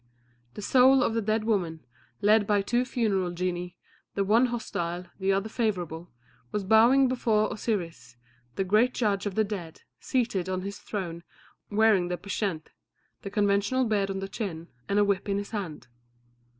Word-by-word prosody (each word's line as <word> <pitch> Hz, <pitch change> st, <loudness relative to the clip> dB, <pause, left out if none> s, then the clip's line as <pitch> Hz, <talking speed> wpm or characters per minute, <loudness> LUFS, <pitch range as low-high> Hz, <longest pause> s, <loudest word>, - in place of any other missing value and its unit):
The 210 Hz, -, -7 dB
soul 260 Hz, +3 st, +5 dB
of -, -, 0 dB
the 230 Hz, -, 0 dB
dead 215 Hz, +1 st, 0 dB
woman, 180 Hz, -8 st, -1 dB, 0.4 s
led 210 Hz, 0 st, +4 dB
by 205 Hz, -1 st, +2 dB
two 240 Hz, +4 st, +1 dB
funeral 205 Hz, -8 st, 0 dB
genii, 175 Hz, 0 st, -3 dB, 0.4 s
the 200 Hz, -, +1 dB
one 225 Hz, +6 st, +4 dB
hostile, 180 Hz, -7 st, -3 dB
the 190 Hz, 0 st, +1 dB
other 195 Hz, +2 st, 0 dB
favourable, 180 Hz, -8 st, -2 dB, 0.4 s
was 210 Hz, -, -2 dB
bowing 230 Hz, +7 st, +5 dB
before 225 Hz, -4 st, +1 dB
Osiris, 165 Hz, -, -4 dB, 0.4 s
the 195 Hz, -, 0 dB
great 215 Hz, +6 st, +3 dB
judge 205 Hz, -3 st, 0 dB
of 195 Hz, -, -4 dB
the 220 Hz, -, +3 dB
dead, 190 Hz, -6 st, -6 dB, 0.2 s
seated 215 Hz, -8 st, -1 dB
on 185 Hz, 0 st, -2 dB
his 200 Hz, +1 st, -6 dB
throne, 175 Hz, -5 st, -5 dB, 0.5 s
wearing 210 Hz, -4 st, +3 dB
the 180 Hz, 0 st, -2 dB
pschent, 195 Hz, -5 st, -3 dB, 0.5 s
the 195 Hz, -, -6 dB
conventional 205 Hz, +5 st, +1 dB
beard 205 Hz, -3 st, 0 dB
on 195 Hz, -, -3 dB
the 195 Hz, -, -3 dB
chin, 185 Hz, -6 st, -5 dB, 0.2 s
and 200 Hz, -, +1 dB
a 205 Hz, -, +5 dB
whip 200 Hz, 0 st, -1 dB
in 200 Hz, -, +1 dB
his 205 Hz, 0 st, -5 dB
hand. 190 Hz, -9 st, -5 dB
200 Hz, 165 wpm, -27 LUFS, 185-220 Hz, 0.5 s, soul